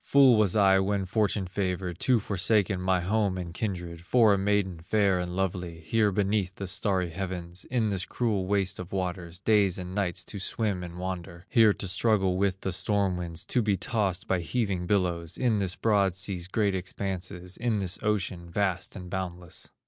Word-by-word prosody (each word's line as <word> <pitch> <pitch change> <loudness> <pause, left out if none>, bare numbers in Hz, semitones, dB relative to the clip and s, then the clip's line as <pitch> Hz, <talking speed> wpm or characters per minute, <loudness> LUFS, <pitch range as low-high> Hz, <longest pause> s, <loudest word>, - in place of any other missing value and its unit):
Fool 135 -3 +6
was 105 -3 +2
I 95 -2 +5
when 95 0 0
fortune 100 0 0
favored, 90 -2 -3
To 125 -3 +3
forsake 100 0 +1
my 90 0 +1
home 100 0 +1
and 85 -2 -5
kindred, 90 -5 -4
For 110 +2 +5
a - - +2
maiden 100 -3 +1
fair 100 +1 +2
and 90 0 -3
lovely, 90 -3 -2
Here 105 +5 +2
beneath 100 -1 0
the 100 - -5
starry 95 -2 0
heavens, 90 -1 -5
In 115 -4 0
this 95 -3 -2
cruel 105 -6 -1
waste 100 -1 0
of 90 0 -7
waters, 90 -2 -3
Days 100 -2 +3
and 90 -1 -6
nights 95 -3 -1
to 100 - -6
swim 100 -1 -1
and 90 -1 -7
wander, 90 -1 -5
Here 110 -3 +6
to 100 - -5
struggle 95 0 +2
with 95 -1 0
the 95 - -2
storm 100 0 +1
winds, 85 -2 -4
To 125 - +1
be 105 -3 +1
tossed 95 -1 -1
by 95 - +1
heaving 95 -1 -1
billows, 90 -4 0
In 115 -5 +2
this 95 -2 -1
broad 100 -5 +2
sea's 90 -1 -2
great 100 0 +1
expanses, 90 -1 -4
In 120 -2 0
this 95 -3 -2
ocean 95 -5 -1
vast 95 0 -1
and 90 -3 -7
boundless. 90 -2 -5
95 Hz, 185 wpm, -28 LUFS, 90-105 Hz, -, Fool